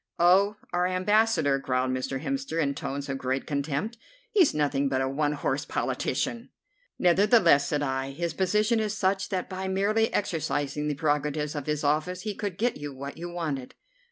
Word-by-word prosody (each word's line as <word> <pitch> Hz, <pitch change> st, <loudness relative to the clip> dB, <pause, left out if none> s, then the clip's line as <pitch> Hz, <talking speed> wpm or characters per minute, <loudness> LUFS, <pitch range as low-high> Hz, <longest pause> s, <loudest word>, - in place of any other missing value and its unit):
"Oh! 190 Hz, +4 st, +5 dB, 0.2 s
our 180 Hz, +1 st, +2 dB
Ambassador!" 185 Hz, -6 st, +2 dB
growled 130 Hz, -1 st, 0 dB
Mr. 130 Hz, +1 st, -3 dB
Hemster 270 Hz, -10 st, -2 dB
in 140 Hz, -3 st, +1 dB
tones 140 Hz, 0 st, -4 dB
of 135 Hz, -1 st, -3 dB
great 130 Hz, +1 st, -1 dB
contempt; 150 Hz, -, -2 dB, 0.3 s
"he's 375 Hz, -8 st, +5 dB
nothing 140 Hz, -2 st, +1 dB
but 130 Hz, -1 st, 0 dB
a 130 Hz, -, +1 dB
one 145 Hz, +2 st, 0 dB
horse 145 Hz, -1 st, -1 dB
politician." 145 Hz, -, -2 dB, 0.5 s
"Nevertheless," 180 Hz, -, +5 dB
said 145 Hz, 0 st, 0 dB
I, 135 Hz, -1 st, -1 dB
"his 165 Hz, +4 st, -3 dB
position 210 Hz, +6 st, +2 dB
is 215 Hz, -1 st, -1 dB
such 195 Hz, 0 st, 0 dB
that 185 Hz, -3 st, -2 dB
by 190 Hz, 0 st, -4 dB
merely 205 Hz, +4 st, +1 dB
exercising 150 Hz, -6 st, -1 dB
the 150 Hz, -, -1 dB
prerogatives 150 Hz, 0 st, 0 dB
of 145 Hz, -2 st, -5 dB
his 150 Hz, 0 st, -1 dB
office 155 Hz, +5 st, 0 dB
he 215 Hz, -1 st, -2 dB
could 200 Hz, -3 st, -4 dB
get 240 Hz, +3 st, 0 dB
you 145 Hz, 0 st, -6 dB
what 140 Hz, +3 st, -7 dB
you 175 Hz, +1 st, -5 dB
wanted." 155 Hz, -7 st, -4 dB
155 Hz, 175 wpm, -27 LUFS, 140-195 Hz, 0.5 s, Oh